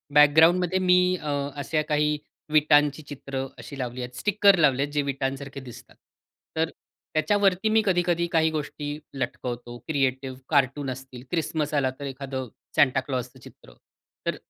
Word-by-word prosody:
बॅकग्राऊंडमध्ये 165 +5 +5
मी 180 -1 +5 0.2
अ, 150 - -3 0.2
अशा 145 +2 -1
काही 150 0 +2 0.4
विटांची 150 -1 +4
चित्रं 135 -2 -5
अशी 120 +4 -9
लावली 125 0 -4
आहेत, 125 0 -7
स्टिकर 200 - +4
लावले 135 -4 +4
आहेत 145 - -5
जे 145 - +2
विटांसारखे 135 0 -3
दिसतात, 125 -3 -12 0.6
तर 160 0 +1 0.4
त्याच्यावरती 195 +5 +2
मी 220 0 +4
कधी-कधी 175 -2 +2
काही 160 -1 +3
गोष्टी 150 -1 -4 0.2
लटकवतो, 120 -2 -4
क्रिएटिव्ह, 135 -3 -1
कार्टून 140 -1 +2
असतील, 130 -1 -9
क्रिसमस 155 -3 -1
आला 140 -3 +2
तर 140 - -5
एखादं 135 -1 -5 0.3
सांता 130 -2 +4
क्लॉसचं 130 -1 -5
चित्र, - - -16 0.5
तर - - +1
145 Hz, 140 wpm, -26 LUFS, 130-160 Hz, 0.6 s, बॅकग्राऊंडमध्ये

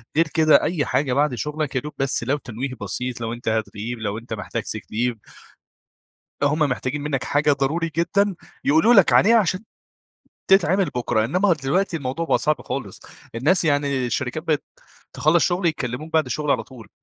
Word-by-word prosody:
غير 165 +1 +3
كده 155 -3 +5
أي 160 -4 0
حاجة 135 -3 0
بعد 145 0 +1
شغلك 150 +3 -3
يا 130 - +1
دوب 150 +3 -8
بس 135 -3 0
لو 135 +5 0
تنويه 130 0 -5
بسيط، 120 +5 -4
لو 115 0 -3
أنت 120 +1 -10
هتغيب، 110 +1 -3
لو 105 -1 -3
أنت 115 0 -7
محتاج 100 -5 -4
Sick - - -5
leave. 120 +1 0 1.3
هم 145 +2 +2
محتاجين 145 -1 -1
منك 145 -3 -2
حاجة 145 +1 +2
ضروري 155 +5 -1
جدًا 200 +4 +1 0.3
يقولوا 160 +12 +4
لك 195 -6 +6
عليها 230 +4 +6
عشان 185 -3 +1 0.9
تتعمل 195 0 +4
بكرة، 120 -7 -1
إنما 180 - +2
دلوقتي 165 +5 0
الموضوع 140 +2 -3
بقى - - +2
صعب 155 -1 +1
خالص. 125 -7 -5 0.3
الناس 155 +10 +2
يعني 140 -4 +1
الشركات 125 +4 -2
بقت 155 -3 0 0.5
بتخلص 160 +3 +3
شغل، 175 0 0
يكلموك 150 0 -3
بعد 160 -1 +3
الشغل 150 -1 -2
على - - +2
طول، 120 -6 -14
145 Hz, 175 wpm, -22 LUFS, 125-165 Hz, 1.3 s, لك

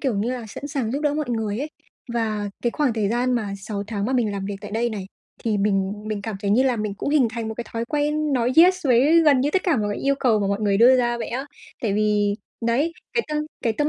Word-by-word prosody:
kiểu 260 -6 0
như 215 +5 0
là, 240 -3 -5
sẵn 285 +7 -7
sàng 265 -6 -2
giúp 280 - -1
đỡ 295 -1 +1
mọi 300 -5 -2
người 220 -2 -1
ấy. 300 +3 -4 0.4
Và 215 -3 -1
cái 240 - +1
khoảng 285 -3 +1
thời 215 -3 0
gian 245 +2 +1
mà 205 -4 -2
6 200 +1 -5
tháng 205 -2 -3
mà 260 - -1
mình 230 -5 +1
làm 195 -1 -4
việc 200 -1 -4
tại - - -8
đây 235 +3 0
này 200 -3 -5 0.4
thì 215 -2 +1
mình 195 -1 +1 0.2
mình 210 -2 -3
cảm 215 -1 -4
thấy 200 - -1
như 235 +6 +4
là 255 -3 +2
mình 210 -2 -3
cũng 280 - -3
hình 275 -6 +4
thành 225 -1 -4
một 220 - -4
cái 240 - -5
thói 230 0 -2
quen 295 +2 0
nói 250 0 +1
yes 365 -1 +6
với 275 +7 +5
gần 280 -4 +5
như 285 - +1
tất 370 +4 +1
cả 345 -7 +2
mọi 210 -2 0
cái - - -5
yêu 275 0 +2
cầu 225 -5 +3
của 195 - 0
mọi 200 +1 -1
người 200 -2 +2
đưa 250 +4 +7
ra 240 -1 +1
vậy - - -4
á. 265 +4 -4 0.4
Tại 210 -4 0
vì 210 -1 +2 0.3
đấy, 285 +8 +1 0.2
cái 465 - +1
tâm 300 0 -1 0.2
cái 230 - +1
tâm 295 +7 0
235 Hz, 280 wpm, -23 LUFS, 210-275 Hz, 0.4 s, đưa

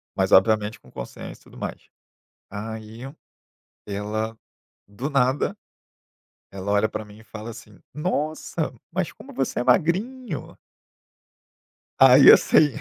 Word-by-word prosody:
mas 95 +1 0
obviamente 105 +2 +4
com 65 - -20
consciência - - -8
e - - -22
tudo - - -16
mais. - - -7 0.6
Aí, 110 +2 -7 0.9
ela 110 +2 -3 0.5
do 120 +8 -5
nada, 140 +8 +1 0.9
ela 95 +1 -5
olha 105 +1 +3
para 110 0 -5
mim 105 0 -15
e 110 - -16
fala 110 +1 -8
assim: 115 - -13 0.2
"Nossa, 155 -1 -2 0.2
mas 180 -1 -2
como - - -13
você 135 -2 -2
é - - -1
magrinho!". 190 - 0 1.4
Aí, 135 +1 +9
assim. 150 -2 +5
115 Hz, 120 wpm, -24 LUFS, 105-150 Hz, 1.4 s, Aí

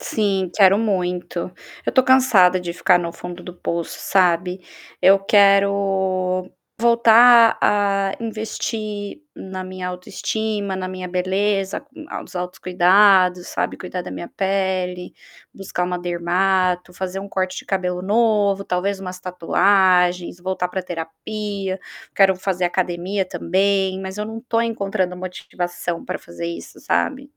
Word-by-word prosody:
Sim, 195 -4 -1
quero 195 0 +5
muito. 180 -5 -2 0.5
Eu - - +2
estou 260 - +4
cansada 215 -9 +5
de 175 -1 -5
ficar 180 +1 +3
no 170 -1 -4
fundo 180 0 -9
do 180 - -9
poço, 170 -1 -4
sabe. 180 0 +1 0.4
Eu 195 +1 +6
quero 195 -2 +2 0.3
voltar 235 0 +6
a 200 -1 +2
investir 215 0 -5 0.2
na 190 0 -7
minha 185 0 -6
autoestima, 200 +3 -3
na 185 0 -4
minha 185 0 -6
beleza, 190 +2 -1
com 290 +2 -14
a - - -5
os - - -16
autocuidados, 180 +1 +3
sabe, - - -3
cuidar 180 0 -6
da - - -8
minha 90 -2 -6
pele, 190 -2 -1 0.4
buscar 190 -2 -3
uma 180 0 -2
dermato, 180 +1 0
fazer 190 +1 -5
um 200 - -8
corte 185 -1 -2
de - - -9
cabelo 180 -2 -2
novo, 205 -1 +2
talvez 195 +2 -1
umas 185 -1 -7
tatuagens, 180 -1 +2
voltar 185 0 -2
para 185 +1 -4
terapia, 190 +4 -5 0.4
quero 195 -1 +5
fazer 185 -1 -2
academia 180 +2 -1
também, 190 +1 0
mas 190 +1 -7
eu 210 - -2
não 225 +1 -6
estou 230 -1 -1
encontrando 200 -5 -1
motivação 175 -1 -5
para 185 - -4
fazer 170 0 -8
isso, 170 - -8
sabe? 280 0 -1
190 Hz, 135 wpm, -21 LUFS, 180-200 Hz, 0.5 s, Eu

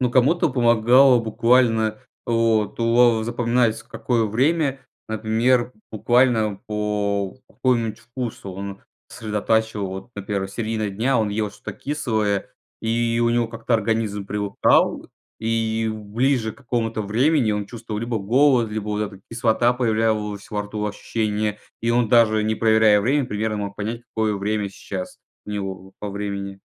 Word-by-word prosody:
Ну, 125 -1 +1
кому-то 145 +6 +3
помогало 120 +1 +5
буквально, 115 -1 +2 0.3
вот 115 -3 +1
уо 115 0 +4
во 110 - -3
запоминается, 120 -1 0
в - - -32
какое 120 -3 0
время. 135 +5 +1 0.3
Например, 115 +3 +1 0.2
буквально 110 -2 +2
по 105 -2 -1
какому-нибудь 120 -4 0
вкусу 120 -4 -6
он 100 +1 -7 0.3
сосредотачивал. 110 -1 -1
Вот, 95 +5 -7
например, 100 -1 -3
середина 110 0 -2
дня, 115 +6 +1
он 110 - +1
ел 105 0 -2
что-то 105 - -8
кислое, 110 -8 -2 0.3
и 115 +1 0
у 115 - +3
него 120 -1 +1
как-то 115 +1 -2
организм 110 -2 0
привыкал, 100 -1 +1 0.3
и 115 0 0
ближе 110 +3 -1
к - - -20
какому-то 115 -4 -2
времени 120 +4 +2
он 105 -1 -2
чувствовал 110 -2 -6
либо 115 -1 -2
голод, 120 +2 +3
либо 105 -1 -4
вот 105 0 -1
эта 100 -2 -6
кислота 120 +1 +2
появлялась 110 -4 -1
во 105 -1 -1
рту, 105 +1 -5
ощущение, 105 0 -2 0.2
и 115 - 0
он, 120 -1 +2
даже 110 -2 +4
не 110 - +1
проверяя 110 -2 +4
время, 135 +5 +1
примерно 105 -2 -2
мог 100 - -10
понять, 115 +3 -4
какое 110 -2 0
время 105 0 -1
сейчас 95 -1 -7 0.3
у - - -6
него 95 -2 -5
по 105 - -5
времени. 100 -1 -5
110 Hz, 145 wpm, -22 LUFS, 105-120 Hz, 0.3 s, помогало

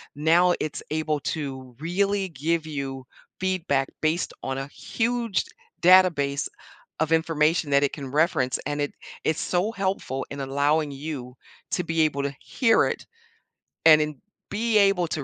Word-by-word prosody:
now 170 +4 +4
it's 155 - -3
able 155 -1 -1
to 130 -4 -5
really 195 +4 0
give 160 +2 -1
you 135 -4 -5 0.3
feedback 180 -8 0
based 160 +3 0
on 135 0 -3
a 135 0 -4
huge 230 +6 -1 0.4
database 170 -7 +5 0.5
of 160 0 0
information 160 -1 +2
that 140 0 +4
it 140 - +1
can 135 -3 -6
reference. 140 -4 +2
And 145 +1 -2
it 145 - -1 0.3
it's 160 - 0
so 185 +5 0
helpful 190 - -2
in 140 - -6
allowing 145 +3 +1
you 135 -3 -6 0.4
to 180 - 0
be 165 0 0
able 145 -3 +1
to 140 0 -2
hear 240 -4 +3
it - - -4 0.8
and 155 -1 +9
in 150 -3 -3 0.3
be 220 +1 +1
able 195 -4 +4
to 155 -3 -3
155 Hz, 150 wpm, -25 LUFS, 140-180 Hz, 0.8 s, and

